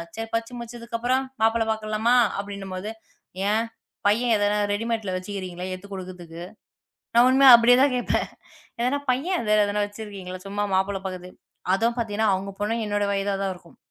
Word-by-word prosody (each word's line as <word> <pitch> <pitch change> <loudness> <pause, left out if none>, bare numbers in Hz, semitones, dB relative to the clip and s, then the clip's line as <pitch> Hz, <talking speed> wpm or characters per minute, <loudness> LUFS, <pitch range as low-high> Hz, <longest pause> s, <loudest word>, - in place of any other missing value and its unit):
சரி 225 0 -4
படிப்பு 230 +2 -2
முடித்ததுக்கு 235 0 -6
அப்புறம் 255 +3 +1 0.2
மாப்பிள்ளை 225 0 +3
பார்க்கலாமா 220 +2 +1 0.2
அப்படி 200 0 -5
என்றுபோது. 195 +1 -5 0.6
ஏன் 220 +2 +2 0.4
பையன் 230 +3 +3
எதோ 205 - +2 0.3
ரெடிமேட்ல 220 -2 -2
வைத்திருக்கீறிங்களா? 185 -1 -5
எடுத்துக் 200 +2 -9
கொடுக்கறதுக்கு. 175 -3 -8 0.7
நான் 240 +1 +7
உண்மையாக 265 -2 +9
அப்படியே 240 +1 +6
தான் 275 -2 +3
கேட்பேன். 245 - 0 0.6
எதோ 285 +2 -1
பையன் 295 - -1
வைத்திருக்கீங்களா? 205 -2 -1
சும்மா 205 +1 -1
மாப்பிள்ளை 190 +1 0
பார்க்குறது. 185 -1 -7 0.4
அதுவும் 230 +4 0
பார்த்தீங்க 220 -3 -2
என்றால், 220 -3 +3
அவங்க 195 +1 -5
பொண்ணு 220 +3 0
என்னோட 205 0 0
வயதாக 195 0 -1
தான் 190 - -1
இருக்கும். 175 -1 -18
210 Hz, 150 wpm, -24 LUFS, 195-230 Hz, 0.7 s, உண்மையாக